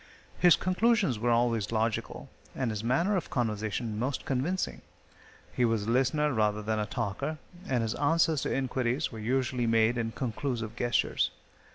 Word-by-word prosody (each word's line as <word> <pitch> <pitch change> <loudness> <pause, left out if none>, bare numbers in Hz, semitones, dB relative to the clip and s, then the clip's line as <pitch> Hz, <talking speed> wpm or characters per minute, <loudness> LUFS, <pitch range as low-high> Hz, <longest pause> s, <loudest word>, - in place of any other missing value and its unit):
His 175 -4 +7
conclusions 185 - +2
were 120 +2 0
always 115 -3 +1
logical, 110 0 -2 0.3
and 125 -4 -1
his 105 0 -4
manner 170 - +2
of 180 - -2
conversation 110 -2 -2
most 130 +3 -2
convincing. 145 +8 -1 0.7
He 125 - +1
was 115 -3 +1
a 115 - 0
listener 135 +4 +2
rather 105 -2 +1
than 110 0 -1
a 105 - -1
talker, 120 +7 -3 0.3
and 125 -3 +1
his 110 -1 -1
answers 160 0 +2
to - - -2
inquiries 130 +1 -1
were 115 - -8
usually 125 +1 0
made 115 +1 +3
in 115 -1 -2
conclusive 115 -3 -3
gestures. 120 0 +1
120 Hz, 160 wpm, -29 LUFS, 110-135 Hz, 0.7 s, His